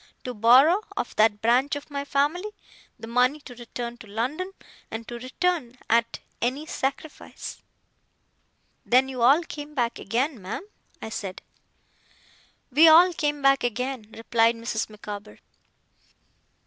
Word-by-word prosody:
To 250 - -5
borrow, 255 - +6 0.2
of - - -3
that 215 -1 +3
branch 250 +5 +3
of 290 +1 -8
my 280 0 -3
family, 295 +9 0 0.5
the - - -9
money 250 +5 +2
to 255 - -11
return 240 0 -7
to 225 - -12
London, 260 - -3 0.4
and 225 0 -6
to 240 0 -6
return 260 0 -2
at 230 0 +2 0.2
any 260 +6 -1
sacrifice.' 285 +1 -5 1.2
'Then 260 +2 +3
you 255 -2 -5
all 275 +8 +5
came 295 -2 -9
back 240 -3 -1
again, 250 0 -1
ma'am?' 200 - -6 0.4
I - - -5
said. 195 -4 -6 1.3
'We 310 +6 +7
all 345 +3 +8
came 295 -3 -2
back 275 0 +4
again,' 245 -1 -3
replied 230 0 +2
Mrs. 230 -1 -3
Micawber. 210 0 -9
250 Hz, 135 wpm, -25 LUFS, 230-290 Hz, 1.3 s, all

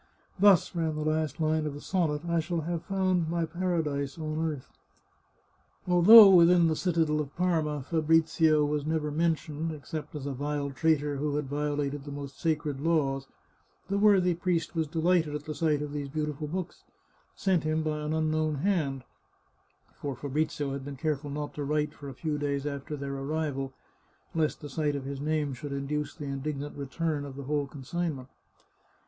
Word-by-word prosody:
" - - -32
Thus," 200 -4 +5
ran 160 -2 0
the 155 0 -3
last 155 -2 0
line 155 -1 +1
of 145 - -4
the - - -7
sonnet, 155 -4 -1
" - - -6
I 170 0 +2
shall 165 +1 -2
have 170 +1 -3
found 185 -4 +1
my 170 0 0
para 175 0 -1
dise 140 -1 -3
on 155 0 -2
earth." 140 -4 -8 1.2
Although 195 +4 +10
within 175 -1 +6
the 160 -1 +2
citadel 160 -3 +1
of 140 -2 -7
Parma 160 -5 0
Fabrizio 160 0 +3
was 145 0 -1
never 155 -1 -1
mentioned, 160 0 -1
except 150 0 -7
as 145 -2 -5
a 140 - -2
vile 145 +1 -2
traitor 145 0 +1
who 145 +1 -1
had 150 -1 -1
violated 145 0 -2
the 145 - -8
most 140 -1 -7
sacred 150 -4 -1
laws, 140 -4 +1 0.6
the 200 +1 +1
worthy 195 -4 +5
priest 170 -1 -1
was 160 -2 0
delighted 165 -1 +1
at 150 - -4
the 155 - -4
sight 150 -2 +1
of 145 -1 -6
these 145 -1 -4
beautiful 150 0 -3
books, 180 +3 -5 0.5
sent 185 -5 +1
him 155 +1 0
by 155 -1 -1
an 150 0 -3
unknown 155 -1 +1
hand 140 -5 0 0.5
— - - -38
for 140 -2 -3
Fabrizio 145 +1 -2
had 140 -1 -5
been 140 0 -7
careful 150 0 -2
not 145 +1 -4
to 145 - -4
write 150 +1 0
for 140 - -9
a 135 - -9
few 150 +1 -2
days 140 -1 -1
after 145 +1 -4
their 140 0 -4
arrival, 135 -1 -2 0.6
lest 160 -2 0
the 150 - -6
sight 150 0 -1
of 140 -1 -4
his 140 0 -5
name 150 -2 0
should 145 +2 -7
in 140 0 -3
duce 150 +1 -3
the 150 - -7
indignant 140 +1 -4
return 145 +2 -2
of 140 -2 -8
the 140 - -7
whole 145 +1 -1
consignment. 140 -1 -4
150 Hz, 190 wpm, -29 LUFS, 145-165 Hz, 1.2 s, Although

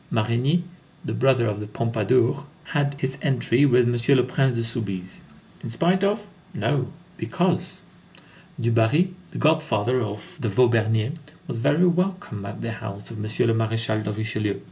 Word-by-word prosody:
Marigny, 120 +10 +1 0.4
the - - -2
brother 130 -2 +3
of 105 -2 -1
the 105 - -5
Pompadour, 115 +5 +1 0.2
had 145 -2 -1
his 135 0 -2
entry 135 -1 +3
with 125 -2 +5
M. 120 +3 +3
le 125 - +4
Prince 130 0 +1
de 115 - -1
Soubise. 100 -6 -4 0.4
In - - -6
spite 175 - +2
of? 205 +1 +1 0.3
No, - - 0 0.3
because. - - -1 0.8
Du 120 -1 +1
Barry, 145 +11 +3 0.2
the - - -9
god 155 0 +3
father 125 -2 0
of 105 - -6
the 115 -5 -1
Vaubernier, 110 +1 +2 0.3
was 115 - -4
very 150 +9 +3
welcome 180 - -1
at 100 - -7
the 115 - -3
house 105 -2 -7
of 115 - -7
M. - - -5 0.3
le 115 - +3
Maréchal 110 -1 0
de 105 - -2
Richelieu. 110 -1 -2
120 Hz, 165 wpm, -24 LUFS, 110-140 Hz, 0.8 s, with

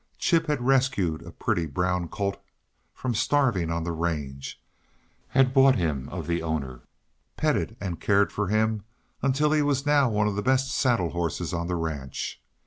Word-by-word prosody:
Chip 165 -1 +2
had 145 -5 -1
rescued 125 -12 +2
a - - -10
pretty, 85 -2 -1
brown 90 +4 -1
colt 100 +1 -3 0.5
from 130 -2 -3
starving 115 - +2
on 85 0 -1
the 85 - -2
range, 75 -5 -3 0.7
had 130 -1 +3
bought 135 -1 +6
him 75 - -1
of 85 -3 -5
the 85 +1 -1
owner, 70 -7 -3 0.6
petted 150 -7 0
and 90 -5 -4
cared 100 0 +3
for 105 -1 -1
him 110 +1 +1 0.4
until 135 +3 +2
he 155 -1 +3
was 145 -1 0
now 145 -3 +4
one 105 -1 +1
of 105 - -1
the 105 - -1
best 130 +2 +2
saddle 120 - +1
horses 85 0 -2
on 85 0 -2
the 90 - -1
ranch. 75 -6 -4
100 Hz, 170 wpm, -26 LUFS, 85-130 Hz, 0.7 s, bought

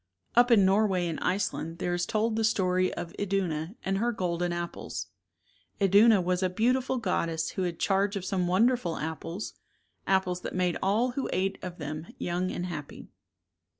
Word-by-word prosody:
Up 245 +1 +6
in 215 -5 +6
Norway 190 -2 +3
and 165 - -3
Iceland 165 -4 -1
there 175 - -1
is 175 0 -1
told 220 +1 0
the 225 - 0
story 185 -4 +2
of 170 - -6
Iduna 185 -3 -1
and 195 0 0
her 240 +2 +1
golden 175 -4 -1
apples. 175 0 -5 0.7
Iduna 200 +2 +6
was 180 +1 0
a 185 - +2
beautiful 250 +7 +1
goddess 165 -7 -1
who - - -3
had 175 -2 -2
charge 195 +1 +1
of 190 -2 -4
some 185 -2 0
wonderful 195 -1 +2
apples, 160 +5 -5 0.5
apples 185 -2 +1
that - - -5
made 180 -2 +1
all 220 +6 +2
who 270 +2 -3
ate 190 +1 -1
of 180 -1 -6
them 155 +1 -5
young 180 +1 -1
and 180 - -3
happy. 150 -5 -7
185 Hz, 170 wpm, -28 LUFS, 175-205 Hz, 0.7 s, Up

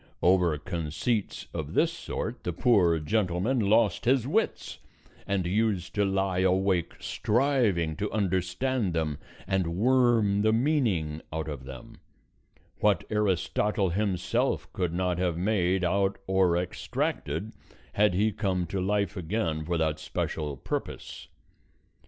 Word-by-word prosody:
Over 90 -4 +4
conceits 85 +7 -2
of - - -5
this - - +3
sort - - -5
the 90 - -2
poor 90 -6 +3
gentleman 95 - 0
lost 110 +2 +2
his 125 -1 +3
wits, 210 +11 -1 0.5
and 100 -3 0
used 100 -1 0
to 105 - +1
lie 95 -1 0
awake 95 -2 +1
striving 110 - +1
to 105 - -2
understand 95 +3 0
them 75 -3 -1 0.3
and 90 -3 -1
worm 115 -3 +3
the 110 +1 +3
meaning 110 - +1
out 80 0 -3
of 70 -4 -6
them; 65 -2 -10 0.8
what 105 -5 +3
Aristotle 105 -1 +1
himself 95 - -1
could 90 -3 -1
not 90 0 -1
have 90 -2 0
made 95 -1 +1
out 95 +2 +1
or 95 -2 +3
extracted, 90 0 -3 0.4
had 105 -3 +3
he 105 +3 +2
come 95 -4 -1
to 95 +3 -3
life 100 +2 0
again 85 -3 -2
for 85 +2 -1
that 80 -1 0
special 75 -2 -3
purpose. - - -5
95 Hz, 130 wpm, -28 LUFS, 85-105 Hz, 0.8 s, Over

